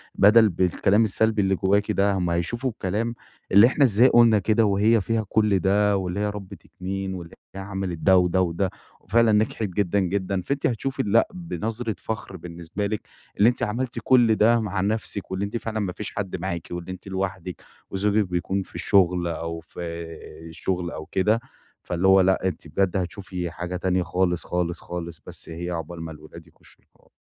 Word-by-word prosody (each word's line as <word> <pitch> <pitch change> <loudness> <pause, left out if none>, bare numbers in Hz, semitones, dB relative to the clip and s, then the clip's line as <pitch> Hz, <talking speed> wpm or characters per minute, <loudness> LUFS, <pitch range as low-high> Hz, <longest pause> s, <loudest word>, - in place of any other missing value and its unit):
بدل 105 +1 +6
بالكلام 95 +4 +2
السلبي 110 +1 +2
اللي 95 0 +2
جواكِ 100 +2 +1
ده، 100 +1 +2
هُم 90 -2 -1
هيشوفوا 95 +10 -1
الكلام 110 +4 -2 0.4
اللي 100 +4 +8
إحنا 140 +3 +2
إزاي 120 +2 +5
قُلنا 115 -3 +6
كده 110 +3 +2
وهي 105 +2 +3
فيها 110 +2 -1
كُلّ 105 -3 +2
ده 100 +2 +2
واللي 95 +1 -3
هي 105 - 0
ربِّت 100 -3 -9
2 95 +1 -5
واللي 85 -2 -8 0.2
هي 95 - -5
عملِت 95 -3 -4
ده 95 -1 +5
وده، 90 +1 +3
وده، 90 +1 0 0.3
وفعلًا 115 -1 +3
نجحِت 110 +1 +1
جدًا، 100 +1 0
جدًا، 95 0 -1
فأنتِ 140 +10 -1
هتشوفي 130 +3 -2
لأ 110 +3 +3
بنظرة 115 - -4
فخر 110 -4 -5
بالنسبة 85 +4 -5
لِك، 105 0 -3 0.4
اللي 110 +4 +6
أنتِ 125 - -3
عملتِ 120 +4 -2
كُلّ 120 -4 +5
ده 115 +2 +4
مع 100 -3 -2
نَفسِك 100 -1 -2
واللي 95 +2 -1
أنتِ 110 +4 -3
فعلًا 110 -1 -4
ما 95 -4 -2
فيش 105 +2 -7
حد 100 -3 -3
معاكِ 85 -2 -4
وإن 85 0 -5
أنتِ 95 +1 -8
لوحدِك، 95 -2 -4 0.3
وزوجِك 105 +2 +2
بيكون 95 +2 -1
في - - -19
الشغل 90 -3 +2
أو 85 0 -4
في 80 +1 -11 0.7
الشغل 90 +1 -3
أو 80 - -7
كده، 105 +7 +1 0.4
فاللي 90 +2 0
هو 95 0 +7
لأ 95 0 +2
أنتِ 85 -2 -5
بجد 95 +4 0
هتشوفي 90 -1 -4
حاجة 85 +1 -5
تانية 90 0 0
خالص، 90 -2 0
خالص، 90 -1 -1
خالص، 85 -2 -7
بس - - -8
هي 85 +2 -5
عقبال 85 0 -5
ما 80 0 -6
الولاد 80 +2 -12
يخشوا 80 - -20
الحض - - -30
95 Hz, 185 wpm, -24 LUFS, 90-105 Hz, 0.7 s, اللي